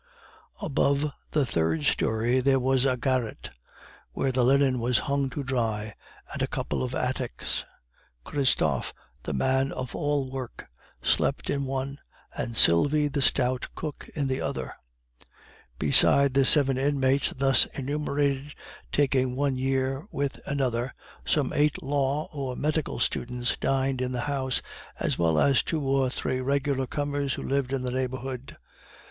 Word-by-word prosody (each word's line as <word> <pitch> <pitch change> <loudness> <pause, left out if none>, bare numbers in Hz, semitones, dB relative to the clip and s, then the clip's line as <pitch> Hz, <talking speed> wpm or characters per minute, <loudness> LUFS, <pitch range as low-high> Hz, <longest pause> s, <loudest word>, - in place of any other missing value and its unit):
Above 140 +1 +1 0.2
the 150 -3 +1
third 80 -8 0
story 115 - +1
there 135 +1 +3
was 130 0 +2
a 130 -1 +1
garret 125 -2 -2 0.6
where 135 - 0
the 125 -1 +1
linen 135 0 +3
was 120 0 +1
hung 140 -1 0
to 140 +3 -5
dry, 110 -5 -2 0.4
and - - -4
a - - +1
couple - - -3
of 130 0 -3
attics. 125 -1 -2 0.6
Christophe, 80 - +1 0.3
the - - -4
man 130 - +1
of 130 -2 -5
all 145 -3 -1
work, 130 -3 -7 0.4
slept - - +1
in 140 -1 -1
one, 135 +1 -3 0.4
and 115 -1 -3
Sylvie, 145 - +6
the 140 - -2
stout 130 -1 +1
cook, 155 -3 -6
in 145 -3 -1
the 130 0 -1
other. 65 -1 -4 1.0
Beside 140 -1 +4
the 135 0 +4
seven 135 -2 +6
inmates 135 -1 +2
thus 135 0 +4
enumerated, 140 0 -2 0.4
taking 130 -3 +1
one 140 0 0
year 135 +4 -1
with 140 -1 -3
another, 130 -3 -1 0.3
some 145 -4 0
eight 150 0 +1
law 140 +1 0
or 135 -3 -4
medical 155 +2 -1
students 125 0 -1
dined 135 -1 0
in 130 0 -1
the 120 - -2
house, 135 -1 -1 0.4
as - - -1
well 80 -2 +2
as 135 - +4
two 160 - -2
or 135 -1 +2
three 130 0 -2
regular 140 0 0
comers 145 -2 -2
who - - -6
lived 135 -1 -1
in 135 -2 -1
the 125 - -2
neighborhood. 130 0 -4
135 Hz, 145 wpm, -27 LUFS, 125-140 Hz, 1.0 s, Sylvie